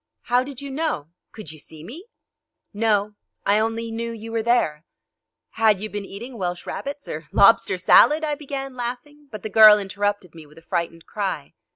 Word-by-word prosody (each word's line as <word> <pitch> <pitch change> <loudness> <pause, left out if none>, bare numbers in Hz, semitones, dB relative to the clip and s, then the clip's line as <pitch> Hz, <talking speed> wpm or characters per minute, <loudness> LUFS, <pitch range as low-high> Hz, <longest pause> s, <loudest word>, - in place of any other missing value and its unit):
"How 245 +1 +2
did 275 0 -9
you 280 - -6
know? 275 - -2 0.2
Could 210 -9 -10
you 155 - -12
see 155 +1 -11
me?" 320 - -11 0.7
"No; 210 -1 +1 0.3
I 205 +1 +3
only 225 +1 -2
knew 230 +1 -4
you 225 0 -8
were 225 0 -1
there." 220 -10 +1 0.7
"Had 215 -3 +3
you 215 +2 -6
been 205 -1 -5
eating 235 +5 -9
Welsh 175 -1 -3
rarebits, 280 0 -6
or 155 0 -6
lobster 200 -2 +5
salad?" 300 - +5
I 300 -1 0
began, 275 -2 -6
laughing, 255 +4 -7
but 215 -3 -8
the 220 - -4
girl 215 0 +8
interrupted 205 -2 -3
me 160 -2 -13
with 150 - -20
a 165 - -15
frightened 165 -1 -3
cry. 190 -9 -4
215 Hz, 185 wpm, -23 LUFS, 190-245 Hz, 0.7 s, girl